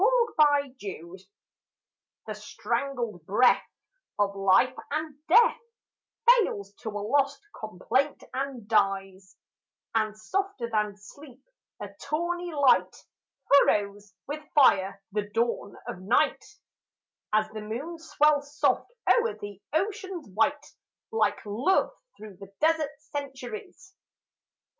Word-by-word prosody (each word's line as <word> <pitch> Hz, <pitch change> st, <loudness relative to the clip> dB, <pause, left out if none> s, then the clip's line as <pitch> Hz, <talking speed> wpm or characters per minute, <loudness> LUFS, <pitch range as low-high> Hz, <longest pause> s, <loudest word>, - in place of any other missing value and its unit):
55 290 Hz, -2 st, +4 dB
EVENING 185 Hz, -3 st, -7 dB, 0.6 s
\ -, -, -66 dB
THE 215 Hz, -, -4 dB
strangled 235 Hz, -, -3 dB
breath 230 Hz, +6 st, +4 dB, 0.5 s
Of 200 Hz, -1 st, +1 dB
life 195 Hz, +6 st, +4 dB, 0.2 s
and 310 Hz, 0 st, -3 dB
death 465 Hz, +7 st, +5 dB, 0.7 s
Fails 390 Hz, -, +4 dB
to 220 Hz, -, -5 dB
a 210 Hz, -, -5 dB
lost 280 Hz, +2 st, +2 dB, 0.2 s
complaint 230 Hz, +7 st, -1 dB
and 260 Hz, -4 st, -4 dB
dies, 195 Hz, -3 st, 0 dB, 0.6 s
And 215 Hz, -1 st, 0 dB
softer 275 Hz, -, -3 dB
than 210 Hz, -2 st, 0 dB
sleep 260 Hz, +6 st, -15 dB, 0.4 s
a -, -, -6 dB
tawny 345 Hz, +3 st, -2 dB
light 285 Hz, -4 st, +3 dB, 0.5 s
Furrows 205 Hz, -7 st, +3 dB
with 300 Hz, +2 st, -5 dB
fire 195 Hz, -8 st, +4 dB
the 205 Hz, 0 st, -2 dB
dawn 230 Hz, -3 st, -1 dB
of 180 Hz, -, -6 dB
night 205 Hz, +6 st, +2 dB, 0.9 s
As 215 Hz, 0 st, +2 dB
the 215 Hz, 0 st, -6 dB
moon 265 Hz, +11 st, -5 dB
swells 300 Hz, -2 st, +1 dB
soft -, -, +1 dB, 0.2 s
o'er 470 Hz, -1 st, +3 dB
the 205 Hz, -1 st, -9 dB
ocean's 385 Hz, -1 st, -2 dB
white 285 Hz, +9 st, +1 dB, 0.5 s
Like 450 Hz, -, 0 dB
love 245 Hz, -, +1 dB, 0.3 s
through 210 Hz, -3 st, -11 dB
the 195 Hz, 0 st, -12 dB
desert 315 Hz, -2 st, +2 dB, 0.3 s
centuries. 280 Hz, -, -7 dB
245 Hz, 110 wpm, -27 LUFS, 205-300 Hz, 0.9 s, death